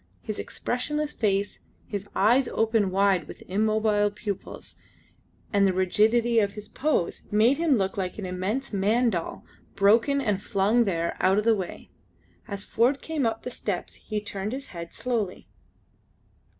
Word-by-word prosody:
His 215 -2 -5
expressionless 300 +4 -2
face, 200 -2 0 0.3
his 205 -1 -5
eyes 240 +6 +4
open 220 -3 +1
wide 195 -1 +2
with - - -10
immobile 215 +1 +2
pupils, 205 -1 -7 0.8
and 200 -1 +4
the 190 - +1
rigidity 220 +5 +3
of 200 -2 +1
his 210 0 -8
pose, 265 - -1
made 225 +7 +3
him 320 -6 +3
look 190 -1 -1
like 185 -2 -3
an 205 - -4
immense 195 +9 -3
man 220 +5 +2
doll 170 -4 -4 0.3
broken 230 +8 +4
and 210 -7 0
flung 210 +4 +2
there 170 -4 -1
out 190 +1 +3
of 210 - +2
the 225 0 +4
way. 190 -3 -6 0.6
As 200 -1 -5
Ford 250 +7 +2
came 305 -6 0
up 225 0 -3
the 250 - -5
steps 200 -6 -4
he 215 -1 -4
turned 205 +1 -4
his 275 +1 -6
head 170 -1 -7
slowly. 225 -7 -3
210 Hz, 155 wpm, -26 LUFS, 195-235 Hz, 0.8 s, eyes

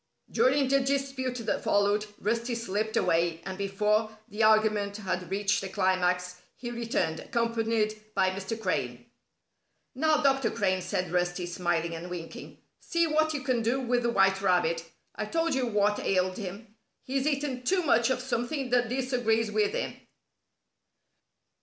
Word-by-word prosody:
During 270 +1 +3
the 275 +1 +4
dispute 270 -2 -1
that - - -1
followed, 205 +1 +2
Rusty 235 +3 -1
slipped 220 0 -2
away, 165 0 +2
and 190 - -4
before 210 +2 0
the 215 -1 -4
argument 215 -2 +3
had 185 -3 -3
reached 195 0 0
a 195 - -4
climax, 180 -2 +1 0.2
he 240 -1 -6
returned, 230 -9 -1
accompanied 225 -2 0
by 190 -1 +3
Mr. 195 +4 -5
Crane. 125 - -2 0.9
"Now, 310 +3 +3
Dr. 270 -4 +3
Crane," 185 -2 0
said 185 -1 -2
Rusty, 175 0 0
smiling 175 -1 -1
and 165 +2 -6
winking, 170 -2 -8 0.2
"see 335 0 +1
what 315 0 +1
you 275 - -3
can 255 -3 +1
do 235 +4 +1
with 245 -1 +1
the 235 - +1
White 195 -3 +3
Rabbit. 175 -3 +2 0.3
I 215 - -3
told 330 +7 0
you 260 -2 0
what 210 -1 +2
ailed 185 -1 0
him. 205 +2 -7 0.3
He's 270 +2 -1
eaten 280 -3 -1
too 365 +8 +1
much 250 -5 +3
of 255 -1 0
something 255 +1 -2
that 245 -2 +3
disagrees 245 -4 0
with 210 -1 +1
him." - - -3
215 Hz, 155 wpm, -28 LUFS, 185-250 Hz, 0.9 s, the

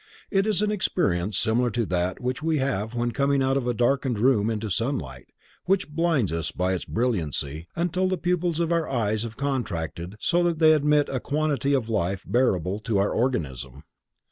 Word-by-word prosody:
It 195 +1 +2
is 210 -1 +1
an 210 - +1
experience 105 - 0
similar 120 +3 +1
to 115 0 -1
that 90 -1 -1
which 125 +2 -3
we 160 0 +1
have 110 -4 -1
when 120 0 0
coming 140 +1 +1
out 135 0 +2
of 135 -3 -1
a 120 - +1
darkened 125 0 +1
room 110 -2 +3
into 110 -2 -3
sunlight, 90 - -3 0.4
which 190 -3 +1
blinds 150 - +1
us 85 0 -2
by 90 +1 -1
its 90 - -3
brilliancy, 80 - -2
until 175 +2 0
the 185 - 0
pupils 175 -1 0
of 170 0 0
our 165 -2 +1
eyes 110 -4 0
have 110 -1 -6
contracted 90 - -3
so 175 +9 +2
that 170 -2 +1
they 155 -1 +6
admit 150 -1 +3
a 130 - -2
quantity 145 -1 0
of 125 -5 -1
light 95 -3 -1
bearable 100 -6 +1
to 110 -1 -1
our 100 +1 +2
organism. 70 - -2
125 Hz, 190 wpm, -25 LUFS, 95-150 Hz, 0.4 s, they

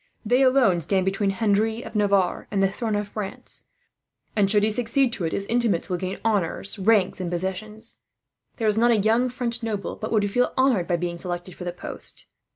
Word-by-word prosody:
They 245 +4 +3
alone 255 -9 +4
stand 190 +3 +1
between 195 +1 0
Henry 220 +3 +1
of - - -9
Navarre 200 -3 +1
and 195 -1 +1
the 195 - +2
throne 220 0 -2
of 205 0 -2
France 205 -2 -7 0.7
and, 200 -3 +3
should 205 0 +4
he 215 - +2
succeed 240 +3 +1
to 185 - -2
it, 160 - -1
his 200 - -2
intimates 230 -6 0
will 180 - +1
gain 185 +2 -4
honours, 200 -1 -1
rank, 200 -2 +2
and 180 -2 -3
possessions. 190 +6 -1 0.6
There 225 - -1
is 215 +1 +3
not 240 +1 +4
a 235 - +4
young 225 +4 +2 0.3
noble 215 -4 -3
but 220 - -6
would 205 -3 +1
feel 245 +4 +1
honoured 255 -10 +3
by 175 - +1
being 170 0 -4
selected 175 0 -5
for 180 - -9
the 175 - -2
post. 175 - -9
205 Hz, 200 wpm, -24 LUFS, 185-225 Hz, 0.7 s, alone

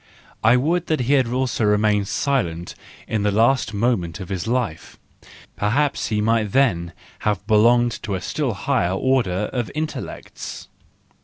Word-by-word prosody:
I 115 +3 +6
would 170 +7 0
that 155 -4 0
he 125 +4 +1
had 130 -4 +3
also 120 -4 +1
been 105 -1 +2
silent 90 - -1 0.3
in 110 - -1
the 105 - +2
last 115 +6 +2
moment 105 -5 -1
of 95 - -7
his 95 -1 -3
life,—perhaps 120 - -3
he 105 -1 0
might 110 -2 +1
then 85 -11 +2 0.3
have 105 -2 -1
belonged 120 +2 +3
to 105 -3 -3
a - - -2
still 130 -3 -2
higher 95 -5 0
order 105 -4 0
of 120 -4 -2
intellects. 155 0 -6
110 Hz, 145 wpm, -22 LUFS, 100-130 Hz, 0.3 s, I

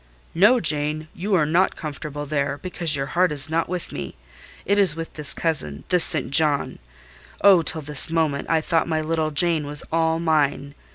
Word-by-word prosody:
"No, 210 +9 +4
Jane, 155 -1 0
you 195 +3 -2
are 155 -4 +2
not 170 +5 +1
comfortable 145 -1 -7
there, 145 -1 -2
because 170 -3 -1
your 135 -1 -3
heart 175 +5 0
is 145 +1 -3
not 165 +1 -1
with 180 -1 -5
me: 70 -3 -7 0.5
it 200 +2 +1
is 185 -6 +5
with 165 0 -7
this 150 -2 0
cousin—this 160 - +1
St. 140 -5 +3
John. 150 -1 +1 0.6
Oh, 195 -4 +6
till 160 0 -2
this 150 0 +3
moment, 160 -4 -2
I 160 -1 +1
thought 165 0 -1
my 160 -1 -1
little 160 0 -2
Jane 155 0 -1
was 145 +1 -2
all 160 0 0
mine! 145 -3 -1
155 Hz, 180 wpm, -22 LUFS, 145-165 Hz, 0.6 s, Oh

